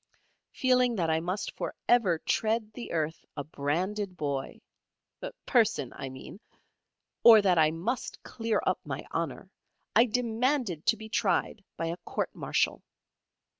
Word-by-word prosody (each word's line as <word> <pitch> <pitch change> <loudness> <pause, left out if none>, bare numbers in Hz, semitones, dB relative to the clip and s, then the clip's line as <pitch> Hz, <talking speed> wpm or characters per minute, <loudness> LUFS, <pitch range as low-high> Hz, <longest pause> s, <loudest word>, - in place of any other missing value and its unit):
Feeling 250 -2 +2
that 165 -5 +1
I 160 - +2
must 180 +5 -3
for - - -4
ever 210 -9 +4
tread 220 +5 0
the 235 - -7
earth 160 -1 -2
a 145 - -2
branded 180 +7 -2
boy 140 -2 -3 0.9
person 205 - +2
I 135 - -5
mean 130 +9 -10 0.8
or 225 -2 +10
that 180 -4 +4
I 155 -1 +5
must 190 +11 -4
clear 225 -1 -1
up - - +1
my - - -5
honour, - - -3 0.4
I 230 - +7
demanded 235 - 0
to 225 0 +4
be 220 0 -9
tried 205 -1 0
by 165 - -2
a 165 +1 -3
Court - - -3
Martial. - - 0
200 Hz, 140 wpm, -29 LUFS, 160-230 Hz, 0.9 s, or